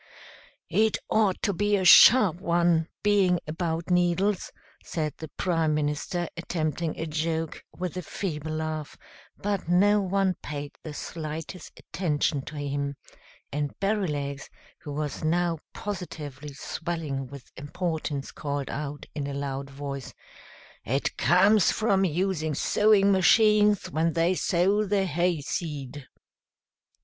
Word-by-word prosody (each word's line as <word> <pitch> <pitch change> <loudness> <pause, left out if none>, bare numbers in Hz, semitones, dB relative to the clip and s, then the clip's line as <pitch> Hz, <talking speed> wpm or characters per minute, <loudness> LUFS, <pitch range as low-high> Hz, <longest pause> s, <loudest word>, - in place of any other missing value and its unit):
"It 220 0 +3
ought 210 -4 +2
to 200 - +1
be 205 +3 +1
a 190 - -1
sharp 210 -2 +8
one, 170 -2 +2 0.2
being 195 -4 +3
about 165 +2 -3
needles," 180 +3 +1 0.3
said 155 -3 -3
the 160 - -6
Prime 165 -4 +1
Minister, 150 +4 -1
attempting 165 -2 -2
a 160 - -2
joke, 160 0 -2
with 180 -1 -4
a 180 - -3
feeble 155 -3 -4
laugh, 155 -1 -4 0.4
but 200 -4 -2
no 205 +4 +4
one 195 -1 +1
paid 145 -1 -5
the 155 -2 -8
slightest 160 +2 -6
attention 150 -3 -1
to 155 - -8
him; 140 -1 -3 0.6
and 145 0 -3
Berrylegs, 150 -9 -2 0.3
who 145 - -8
was 150 0 -4
now 170 0 +1
positively 150 -8 -6
swelling 150 -4 -4
with 140 0 -12
importance, 155 -2 -3
called 140 -2 -4
out, 145 0 -5
in 145 -2 -3
a 140 - -4
loud 140 -1 -4
voice, 140 -1 -6 0.7
"It 135 +5 -1
comes 195 +4 +4
from 195 -3 +2
using 165 -3 -1
sewing 205 +4 +4
machines 210 +1 +4
when 160 +1 +1
they 170 +2 +2
sow 190 +3 +2
the 200 -1 +1
hay 175 -2 0
seed!" 145 -3 -5
165 Hz, 125 wpm, -27 LUFS, 150-185 Hz, 0.7 s, sharp